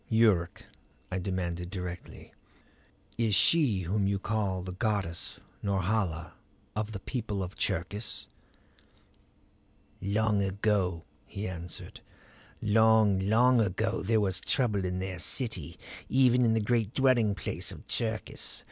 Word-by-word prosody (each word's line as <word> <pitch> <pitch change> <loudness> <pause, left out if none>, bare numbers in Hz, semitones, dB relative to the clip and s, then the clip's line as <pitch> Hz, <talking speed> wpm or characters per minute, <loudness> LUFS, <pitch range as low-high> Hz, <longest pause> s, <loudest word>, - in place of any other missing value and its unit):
"Yuruk," 110 -7 +3 0.5
I 95 - -1
demanded 90 -2 -3
directly, 90 -2 -7 0.9
"is 110 -3 +3
she 110 - +4
whom 95 +3 0
you 100 0 +1
call 100 -3 -1
goddess 95 -2 -2 0.2
Norhala 95 -4 -1 0.4
of 105 0 -2
the 100 - -5
people 105 -3 -3
of 90 +1 -7
Cherkis?" 100 +6 -2 1.8
"Long 105 +1 +1
ago," 95 -3 0 0.2
he 100 +2 -5
answered; 90 -2 -7 0.6
"long, 110 -2 +4
long 115 +5 +4
ago 110 +3 0
there 110 +3 +2
was 95 -3 +2
trouble 105 -7 +1
in 90 0 -2
their 95 -1 -4
city, 90 - -2 0.3
even 125 -2 +4
in 115 - +3
the 110 - +2
great 115 0 0
dwelling 120 -6 +3
place - - -2
of - - -11
Cherkis. 110 -2 -1
100 Hz, 120 wpm, -29 LUFS, 95-110 Hz, 1.8 s, she